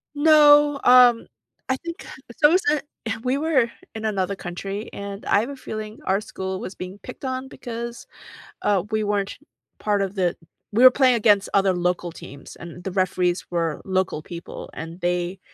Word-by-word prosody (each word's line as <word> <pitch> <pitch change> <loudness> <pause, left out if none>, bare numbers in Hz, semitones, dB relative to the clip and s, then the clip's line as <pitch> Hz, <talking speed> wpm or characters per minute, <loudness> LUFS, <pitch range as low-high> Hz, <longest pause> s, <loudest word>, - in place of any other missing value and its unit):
No, 295 -1 +6
um, 245 -2 +6 0.4
I 260 - +1
think 335 -2 -8 0.2
it's 235 - -14
almost 340 +6 +5
a 300 - +3 0.3
uh, 225 - -2
we 255 +2 +1
were 280 -6 +1 0.2
in 220 0 -5
another 200 -2 -1
country, 195 +4 -6
and 200 0 -7
I - - +3
have 235 +6 -2
a 280 - -6
feeling 215 -4 -7
our 195 +2 +1
school 190 -2 -5
was 190 - -7
being 185 +2 -8
picked 255 - -9
on 260 0 -3
because, 235 -1 -7 0.6
uh, 200 -4 +2
we 215 0 0
weren't 205 -1 -1 0.4
part 205 -1 0
of 195 0 -3
the 180 -3 0 0.4
We 235 - +4
were 255 - +10
playing 255 -1 +4
against 205 -3 +3
other 195 -1 +4
local 175 -1 -1
teams, 140 -3 -11
and 170 +1 -10
the 190 - -4
referees 180 -1 0
were 165 -3 -1
local 185 -4 -1
people, 170 +2 -9
and 165 +2 -8
they 175 +1 -1
205 Hz, 180 wpm, -23 LUFS, 185-255 Hz, 0.6 s, were